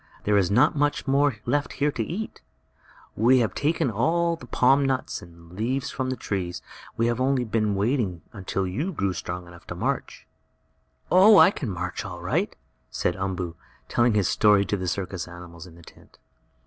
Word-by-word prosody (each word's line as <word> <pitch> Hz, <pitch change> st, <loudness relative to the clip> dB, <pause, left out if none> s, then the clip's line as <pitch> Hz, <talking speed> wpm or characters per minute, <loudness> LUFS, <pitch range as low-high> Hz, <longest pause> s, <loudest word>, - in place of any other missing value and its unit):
There 105 Hz, -, +2 dB
is 95 Hz, -3 st, +3 dB
not 130 Hz, +10 st, +4 dB
much 145 Hz, 0 st, 0 dB
more 140 Hz, -2 st, +2 dB
left 145 Hz, 0 st, 0 dB
here 145 Hz, +1 st, +1 dB
to 120 Hz, -, -3 dB
eat. 185 Hz, -, -5 dB, 0.7 s
We 120 Hz, +5 st, +4 dB
have 115 Hz, -4 st, +1 dB
taken 145 Hz, -4 st, 0 dB
all 170 Hz, +10 st, +1 dB
the 150 Hz, -7 st, -13 dB
palm 135 Hz, +4 st, +3 dB
nuts 130 Hz, -1 st, -1 dB
and 85 Hz, -1 st, -15 dB
leaves 120 Hz, +8 st, -2 dB
from 130 Hz, -1 st, -3 dB
the 130 Hz, -, -1 dB
trees. 90 Hz, -7 st, -4 dB, 0.3 s
We 115 Hz, -, +2 dB
have 120 Hz, +1 st, 0 dB
only 130 Hz, -1 st, +2 dB
been 110 Hz, -3 st, 0 dB
waiting 100 Hz, -4 st, 0 dB
until 95 Hz, -1 st, -3 dB
you 145 Hz, -, -3 dB
grew 100 Hz, -, -1 dB
strong 90 Hz, 0 st, -5 dB
enough 85 Hz, 0 st, -15 dB
to -, -, -6 dB
march." -, -, -3 dB, 0.9 s
"Oh, 200 Hz, +3 st, +8 dB
I -, -, +8 dB
can 140 Hz, -, -5 dB
march 90 Hz, -2 st, -4 dB
all -, -, -7 dB
right," -, -, -1 dB, 0.3 s
said 90 Hz, -, -1 dB
Umboo, 95 Hz, -3 st, -3 dB, 0.3 s
telling 120 Hz, -2 st, +2 dB
his 100 Hz, -4 st, +2 dB
story 105 Hz, -1 st, +4 dB
to 105 Hz, -, -1 dB
the 95 Hz, -2 st, -4 dB
circus 95 Hz, 0 st, -3 dB
animals 85 Hz, 0 st, -11 dB
in 85 Hz, -, -15 dB
the 85 Hz, -, -16 dB
tent. -, -, -18 dB
110 Hz, 185 wpm, -25 LUFS, 90-135 Hz, 0.9 s, Oh